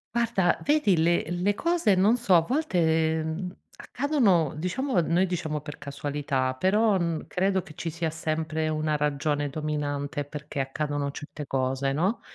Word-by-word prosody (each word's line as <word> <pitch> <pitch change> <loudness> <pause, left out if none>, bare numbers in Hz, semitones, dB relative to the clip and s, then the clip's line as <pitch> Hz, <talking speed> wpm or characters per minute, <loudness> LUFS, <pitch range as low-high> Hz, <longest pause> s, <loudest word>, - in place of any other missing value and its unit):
Guarda, 230 -7 +2
vedi 285 - +3
le 170 +2 +3
le 180 +4 +1
cose 335 - +2
non 205 +6 +4
so, 235 -5 +1
a 170 - +7
volte, 160 - +1
uhm, 180 +4 -4 0.2
accadono 215 - +1
diciamo 185 - 0
noi 170 +3 +2
diciamo 160 -4 -3
per 150 0 -8
casualità, 140 -2 -2
però 205 +6 +3
n 170 -3 -2
credo 190 +1 +1
che 155 - -14
ci 165 - -4
sia 165 0 -2
sempre 155 0 -2
una 155 0 0
ragione 145 0 0
dominante 145 -1 -3
perché 145 0 -5
accadono 145 +1 -2
certe 150 +1 -8
cose, 135 0 0
no, 185 - 0
160 Hz, 150 wpm, -27 LUFS, 145-190 Hz, 0.2 s, a